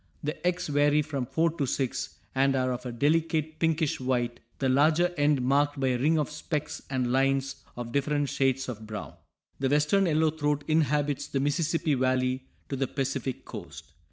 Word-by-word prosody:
The 150 +4 -2
eggs 180 0 0
vary 145 +1 +3
from 140 -5 -3
four 165 +4 +1
to 140 - +1
six, 130 0 -2 0.2
and 135 +1 +3
are 130 -1 +1
of 125 +1 -5
a - - -4
delicate 155 +4 +1
pinkish 160 -2 +1
white, 125 -2 -1 0.2
the 135 - 0
larger 155 +7 +3
end 145 -3 +2
marked 145 +2 +2
by 135 -1 +2
a 125 -1 0
ring 155 +5 +3
of 150 -2 -1
specks 150 0 -4
and 130 -2 0
lines 135 +1 +1 0.2
of 120 -1 -5
different 145 +1 0
shades 135 -1 +1
of 110 -3 -6
brown. 105 -1 -6 0.5
The 135 -1 +1
western 150 +7 +3
yellow 155 -1 +3
throat 150 -2 -1
inhabits 150 -2 +1
the 135 - -1
Mississippi 155 +3 +1
valley 130 0 0 0.2
to 140 - -2
the 135 0 0
Pacific 135 -1 -3
coast. - - -9
140 Hz, 180 wpm, -28 LUFS, 130-150 Hz, 0.5 s, vary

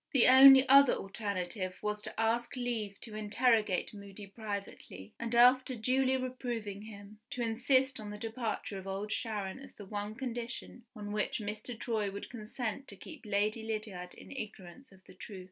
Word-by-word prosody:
The 260 -4 +5
only 265 +1 +10
other 275 0 +8
alternative 195 -2 -3
was 210 0 -1
to - - -5
ask 230 +3 0
leave 230 -5 -3
to 225 - -9
interrogate 215 -2 +1
Moody 200 0 -10
privately, 200 - -7
and, 235 0 -2
after 255 +2 +6
duly 260 +3 +2
reproving 240 -5 -4
him, 210 -1 -11
to 245 - -3
insist 260 +3 +2
on 210 -1 -7
the 210 - -6
departure 220 -3 -4
of 190 - -10
Old 195 +2 -4
Sharon 210 -2 -3
as 270 - -13
the 205 - -10
one 205 +1 -4
condition 240 -1 -6
on 205 -1 -6
which 210 0 -1
Mr. 215 +2 -5
Troy 220 -4 -1
would 200 +1 -7
consent 240 +2 -4
to 200 - -10
keep 275 - -11
Lady 210 +2 +1
Lydiard 215 -5 -5
in - - -13
ignorance 215 -1 -8
of 190 -1 -19
the - - -15
truth. 200 -4 -9
220 Hz, 170 wpm, -32 LUFS, 205-245 Hz, -, only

